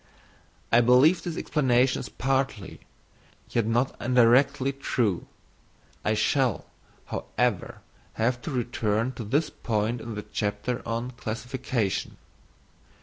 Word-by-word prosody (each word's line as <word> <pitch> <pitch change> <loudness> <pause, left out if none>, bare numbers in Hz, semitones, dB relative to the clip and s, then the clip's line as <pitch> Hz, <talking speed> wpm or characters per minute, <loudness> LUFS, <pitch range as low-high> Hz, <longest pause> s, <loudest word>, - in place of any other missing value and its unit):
I 115 - +6
believe 130 +9 +5
this 170 -1 -5
explanation 130 -3 +2
is - - -6
partly, 130 -7 -2 0.7
yet 115 -2 +1
only 120 +4 +1
indirectly, 130 +3 +4
true; 120 -8 -1 0.8
I 110 - +1
shall, 125 +2 +1 0.4
however, 120 -7 -2 0.3
have 120 +2 0
to - - -5
return 120 -3 -1
to 115 -2 -7
this 145 +9 0
point 115 +1 -1
in 115 -2 -6
the 105 - -5
chapter 105 +3 -2
on 115 +2 -2
Classification. 120 -2 -3
120 Hz, 110 wpm, -26 LUFS, 110-130 Hz, 0.8 s, I